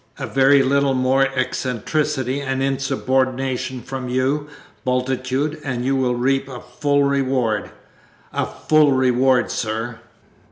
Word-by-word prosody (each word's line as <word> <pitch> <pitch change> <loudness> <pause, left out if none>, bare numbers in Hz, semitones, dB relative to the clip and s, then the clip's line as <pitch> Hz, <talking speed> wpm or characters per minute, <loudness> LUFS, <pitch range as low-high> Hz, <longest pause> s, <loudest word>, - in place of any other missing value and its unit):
A - - -4
very 135 +1 +4
little 140 0 +2
more 130 +1 +3
eccentricity 130 +2 -1
and 135 -1 -2
insubordination 130 -2 -1
from 130 -1 -5
you, 135 +4 0 0.4
Bultitude, 130 +3 -1
and 125 -3 -3
you 135 +1 +1
will 125 -2 +1
reap 135 +2 0
a 125 -2 -7
full 140 +4 0
reward 130 -6 0 0.6
a - - -1
full 155 -2 +3
reward, 130 0 +2
sir!" 115 +1 -3
130 Hz, 120 wpm, -21 LUFS, 125-135 Hz, 0.6 s, very